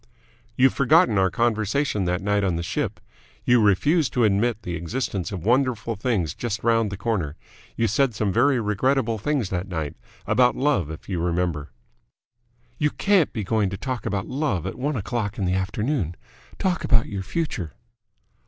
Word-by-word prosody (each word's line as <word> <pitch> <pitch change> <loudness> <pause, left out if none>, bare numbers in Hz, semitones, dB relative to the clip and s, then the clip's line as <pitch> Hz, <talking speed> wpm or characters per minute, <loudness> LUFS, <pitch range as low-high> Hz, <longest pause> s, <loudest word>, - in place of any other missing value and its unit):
"You've 130 +1 +4
forgotten 140 - +4
our 95 0 +3
conversation 110 0 0
that 90 +1 -1
night 105 0 +1
on 90 -3 +1
the 85 - -2
ship. 85 - -2 0.5
You 120 -1 +5
refused 140 - +3
to 125 - +2
admit 110 +2 +1
the 90 - -4
existence 90 +1 -3
of 95 -3 -5
wonderful 120 -2 +1
things 105 - -1
just 110 -3 -4
round 115 -2 +3
the 100 - -6
corner. 95 - -2 0.4
You 115 - +1
said 120 +2 +1
some 100 -2 0
very 125 +3 +3
regrettable 115 +2 +1
things 135 -3 -1
that 90 +1 -2
night. 80 -6 -4 0.3
About 125 -1 +3
love, 130 - +1
if 80 - -9
you 90 -4 -2
remember." 85 -3 -1 1.1
"You 150 - +3
can't 195 -1 +2
be 110 - -3
going 105 0 +1
to 100 - -5
talk 130 0 -4
about 95 -1 -1
love 135 - -1
at - - -3
one 145 +3 -2
o'clock 110 -1 -3
in 100 - -1
the 90 - +1
afternoon! 95 - -1 0.4
Talk 180 -3 0
about 115 -2 +3
your 100 -2 -4
future." 95 - -3
110 Hz, 170 wpm, -24 LUFS, 95-130 Hz, 1.1 s, You